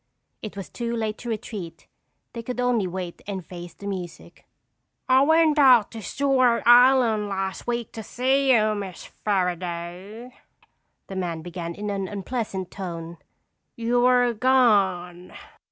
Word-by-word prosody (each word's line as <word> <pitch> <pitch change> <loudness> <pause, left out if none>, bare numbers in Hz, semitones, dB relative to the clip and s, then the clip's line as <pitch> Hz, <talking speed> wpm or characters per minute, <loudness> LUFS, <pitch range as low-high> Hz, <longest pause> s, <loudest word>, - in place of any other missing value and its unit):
It 215 -2 -8
was 195 - -6
too 235 -1 -4
late 220 -2 -3
to 240 - -7
retreat. 210 -7 -6 0.5
They 235 - -5
could 250 +2 -6
only 245 -6 +1
wait 180 -1 -6
and 190 -4 -5
face 175 -1 -10
the 200 - -12
music. 180 -4 -7 0.6
"I 260 +1 +5
went 315 +1 +4
out 250 -6 +6
to 225 - -8
Stewart 255 -1 +2
Island 240 -3 +5
last 195 -1 -4
week 235 -2 -2
to 225 - -7
see 265 +4 +1
you, 215 -3 +4
Miss 195 -4 -6 0.2
Fairaday," 180 +4 -3 0.7
the 195 - -8
man 170 -4 -3
began 170 -1 -6
in 210 0 -4
an 195 -1 -3
unpleasant 200 -2 -4
tone. 170 -3 -7 0.6
"You 235 +1 +1
were 245 -1 +4
gone." 200 -8 +2
210 Hz, 140 wpm, -24 LUFS, 185-245 Hz, 0.7 s, out